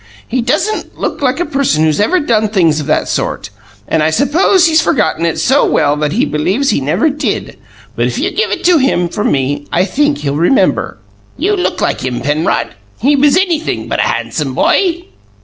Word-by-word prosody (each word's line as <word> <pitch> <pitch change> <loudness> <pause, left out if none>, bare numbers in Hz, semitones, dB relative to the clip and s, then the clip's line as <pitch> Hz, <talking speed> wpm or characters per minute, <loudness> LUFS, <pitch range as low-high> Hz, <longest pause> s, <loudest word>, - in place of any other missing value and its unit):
He 255 +1 -1
doesn't 305 - -2
look - - -3
like 265 +1 0
a 350 - 0
person 270 - 0
who's 155 -2 +1
ever 355 - +2
done 220 -8 +1
things 165 -7 +2
of 150 - -5
that - - 0
sort, - - -3 0.4
and 160 - 0
I 155 - +2
suppose 330 - +3
he's 320 -1 +4
forgotten 230 - 0
it 165 - -2
so 275 +3 +2
well 145 -1 +2
that 150 0 -1
he - - +1
believes 195 - 0
he - - 0
never 180 - +1
DID, 290 - -3 0.4
but - - 0
if - - -4
you - - -1
give 440 - -1
it - - -3
to 350 -2 +4
him 255 -10 +1
from 210 +4 -1
me 145 +1 -1
I 180 +2 +2
think 290 +8 0
he'll 140 -1 -3
remember. 175 - +1 0.4
You 415 +2 0
look 365 - -2
like - - -1
him, 125 -2 -2
Penrod. 145 +5 -1 0.3
He 280 +7 +2
was 285 +3 +3
anything 345 -4 -1
but - - -2
a - - +1
handsome - - -3
boy." 350 -2 +1
250 Hz, 200 wpm, -13 LUFS, -, 0.4 s, he's